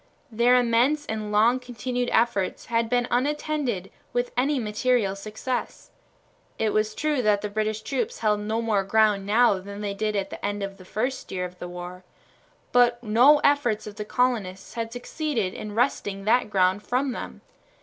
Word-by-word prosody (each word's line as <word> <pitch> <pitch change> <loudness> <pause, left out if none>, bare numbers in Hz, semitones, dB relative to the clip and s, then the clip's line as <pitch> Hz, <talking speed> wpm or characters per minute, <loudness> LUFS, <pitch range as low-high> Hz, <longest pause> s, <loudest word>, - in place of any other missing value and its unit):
Their 235 +3 +4
immense 250 +5 +2
and 215 -3 -4
long 225 +4 +4
continued 245 0 -3
efforts 225 -5 +1
had 230 -1 0
been 245 0 +1
unattended 265 -6 -1 0.2
with 245 0 0
any 275 +4 +1
material 220 -2 +1
success. 215 +5 -5 0.7
It 220 -1 0
was 215 0 0
true 300 -3 0
that 210 -3 +2
the 210 - -4
British 215 +1 -1
troops 270 -2 -2
held 210 -2 +1
no 220 +2 -2
more 210 -4 +1
ground 210 -1 +2
now 215 -2 +4
than 200 +2 -8
they 205 -1 -2
did 215 +1 -2
at 195 -1 -2
the - - -8
end 205 0 -2
of 195 0 -5
the 185 - -14
first 250 +7 -3
year 180 -1 -2
of 180 0 -10
the 175 - -6
war, 180 +1 -8 0.7
but 240 -1 +3
no 245 +7 +6
efforts 285 -7 +2
of 210 -1 -9
the 210 - -3
colonists 210 -5 -1
had 230 -1 -4
succeeded 245 -4 -2
in 210 -1 -7
wresting 205 -5 0
that 235 +1 +3
ground 190 0 +2
from 255 +4 -1
them. - - -7
220 Hz, 175 wpm, -25 LUFS, 205-245 Hz, 0.7 s, no